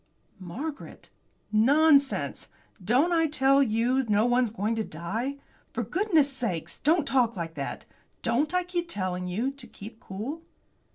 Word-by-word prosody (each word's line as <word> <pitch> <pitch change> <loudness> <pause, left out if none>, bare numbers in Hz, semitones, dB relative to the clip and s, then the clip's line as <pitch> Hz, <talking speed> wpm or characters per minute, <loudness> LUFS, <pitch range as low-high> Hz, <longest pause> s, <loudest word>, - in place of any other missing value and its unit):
"Margaret." 270 - -7 0.4
"Nonsense! 280 +5 +3 0.4
Don't 255 - +3
I 325 -1 +3
tell 275 -2 +3
you 245 +2 +2
no 210 +2 +3
one's 245 -1 +3
going 215 +1 -1
to 220 - 0
die? 215 - -4 0.4
For 240 - -1
goodness' 310 - +2
sake 230 - -3
don't 315 +1 +3
talk 245 -4 +2
like 165 -3 -4
that. 140 -3 -5 0.4
Don't 255 +6 +1
I 360 0 +1
keep 350 -1 -3
telling 185 - -3
you 225 +9 -1
to 275 +1 -9
keep 220 +2 -11
cool?" 230 +14 -6
245 Hz, 145 wpm, -27 LUFS, 210-295 Hz, 0.4 s, Nonsense